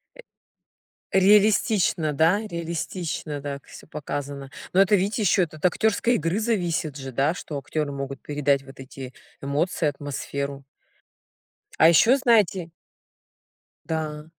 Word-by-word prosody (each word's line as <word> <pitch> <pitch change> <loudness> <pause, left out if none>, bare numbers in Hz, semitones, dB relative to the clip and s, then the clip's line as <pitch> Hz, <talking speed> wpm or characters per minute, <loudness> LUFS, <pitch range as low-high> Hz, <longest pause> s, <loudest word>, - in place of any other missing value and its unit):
Э. - - -20 0.9
Реалистично, 195 -4 +3
да? 165 +8 +3
Реалистично 165 -3 -4
так 140 -1 -6
всё - - -13
показано. 140 -2 -6 0.2
Но 190 - +6
это 200 +1 +4
видите 200 +4 0
ещё 190 -1 +4
от 155 +1 -5
актерской 220 +6 +2
игры 165 +5 0
зависит 175 - -1
же, 135 -1 -7
да, 140 +6 +1
что 150 -4 -6
актеры 150 +1 -3
могут 135 0 -6
передать 145 -2 0
вот 135 0 -14
эти 130 -1 -9 0.3
эмоции, 150 +4 0
атмосферу. 140 -1 -4 1.1
А 160 - +7
ещё 230 - +5
знаете. 210 - +2 1.2
Да. 155 -2 -3
155 Hz, 120 wpm, -24 LUFS, 140-190 Hz, 1.2 s, А